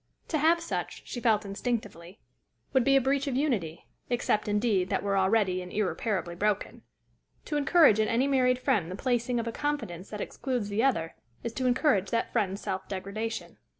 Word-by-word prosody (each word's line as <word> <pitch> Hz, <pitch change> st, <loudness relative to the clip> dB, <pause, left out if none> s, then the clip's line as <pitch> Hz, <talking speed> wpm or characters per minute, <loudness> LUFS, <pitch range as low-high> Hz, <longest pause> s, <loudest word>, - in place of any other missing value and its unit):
To 310 Hz, -, 0 dB
have 330 Hz, +3 st, +4 dB
such, 335 Hz, -, -4 dB
she 245 Hz, -, -5 dB
felt 220 Hz, -3 st, +2 dB
instinctively, 200 Hz, -4 st, -4 dB, 0.5 s
would 260 Hz, -2 st, +4 dB
be 275 Hz, +1 st, +4 dB
a 270 Hz, -, +5 dB
breach 275 Hz, +2 st, +1 dB
of 265 Hz, -, -1 dB
unity, 215 Hz, -, -1 dB, 0.2 s
except, 240 Hz, -3 st, 0 dB
indeed, 205 Hz, -3 st, +1 dB
that -, -, 0 dB
were 200 Hz, -1 st, 0 dB
already, 190 Hz, -1 st, +2 dB
and 180 Hz, 0 st, -9 dB
irreparably, 190 Hz, -2 st, -1 dB
broken. 205 Hz, +3 st, -1 dB, 0.6 s
To 300 Hz, -, -3 dB
encourage 295 Hz, -, +5 dB
in 215 Hz, -, +3 dB
any 245 Hz, +3 st, +2 dB
married 255 Hz, -2 st, +3 dB
friend 195 Hz, -8 st, 0 dB
the 185 Hz, -, -5 dB
placing 245 Hz, +1 st, 0 dB
of 230 Hz, -, -2 dB
a -, -, -1 dB
confidence 225 Hz, -, -3 dB
that 210 Hz, -, -6 dB
excludes 245 Hz, -2 st, -3 dB
the 210 Hz, +3 st, 0 dB
other, 165 Hz, -12 st, +1 dB, 0.3 s
is 235 Hz, -, -4 dB
to 255 Hz, +1 st, -1 dB
encourage 250 Hz, -, +2 dB
that 230 Hz, -1 st, -1 dB
friend's 200 Hz, -4 st, 0 dB
self 190 Hz, 0 st, -3 dB
degradation. 200 Hz, +4 st, -5 dB
225 Hz, 185 wpm, -28 LUFS, 195-255 Hz, 0.6 s, a